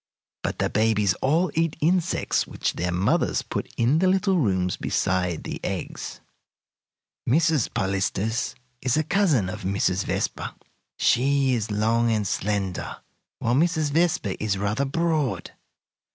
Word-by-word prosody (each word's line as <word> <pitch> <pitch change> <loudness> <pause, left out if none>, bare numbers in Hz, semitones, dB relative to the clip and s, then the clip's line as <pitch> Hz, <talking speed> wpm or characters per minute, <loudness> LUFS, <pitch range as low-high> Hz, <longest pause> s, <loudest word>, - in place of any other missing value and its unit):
But - - -3
the - - +1
babies 105 -2 +2
all 165 +7 +2
eat 165 -1 0
insects 175 +2 +1
which - - -2
their 90 +1 -2
mothers 90 +2 +1
put - - -4
in 125 +7 +3
the 185 - +3
little 190 0 +2
rooms 95 - +1
beside 90 -3 -1
the - - -5
eggs. - - -5 1.1
"Mrs. 155 -1 +3
Polistes 100 +3 -1 0.3
is 130 +2 +1
a 155 - +2
cousin 155 - +2
of 95 - -5
Mrs. 95 0 0
Vespa. - - -2 0.4
She 135 +1 +3
is 110 -3 -1
long 115 +3 +2
and 105 -2 0
slender, 100 -1 -2 0.4
while 115 - 0
Mrs. 155 +1 +2
Vespa 160 - +1
is 100 -2 0
rather 105 +7 0
broad. 155 -2 -1
120 Hz, 135 wpm, -25 LUFS, 100-160 Hz, 1.1 s, in